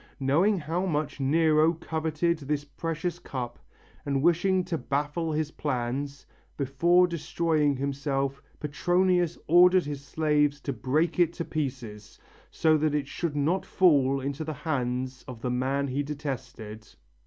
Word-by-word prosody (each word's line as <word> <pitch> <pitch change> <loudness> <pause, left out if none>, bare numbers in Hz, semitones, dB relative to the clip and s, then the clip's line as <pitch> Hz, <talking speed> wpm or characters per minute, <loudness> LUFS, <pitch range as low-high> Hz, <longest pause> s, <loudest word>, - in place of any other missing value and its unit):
Knowing 165 +10 +3
how 165 +3 -2
much 150 -3 -2
Nero 155 +3 +3
coveted 160 +1 -1
this 145 0 -2
precious 165 +3 -4
cup 125 -7 -6 0.4
and 140 -1 -1
wishing 180 +2 +3
to 175 -1 -3
baffle 150 +4 -2
his 155 0 -1
plans, 140 0 -3 0.3
before 170 +7 +3
destroying 160 -3 0
himself 140 0 -2 0.2
Petronius 175 +3 +1
ordered 180 +2 +6
his 145 -1 -5
slaves 150 -1 +1
to 140 - -3
break 150 +9 0
it 170 -1 +3
to 170 - -4
pieces, 125 -8 -5 0.3
so 160 -1 +3
that 155 -1 +1
it 145 -2 -1
should 160 0 -3
not 160 +6 +1
fall 140 -7 +3
into 140 +3 -3
the 155 0 -4
hands 130 -3 -2
of 125 -3 -8
the 125 - -1
man 135 +3 0
he 135 +3 -1
detested. 130 -7 -6
150 Hz, 140 wpm, -27 LUFS, 135-165 Hz, 0.4 s, ordered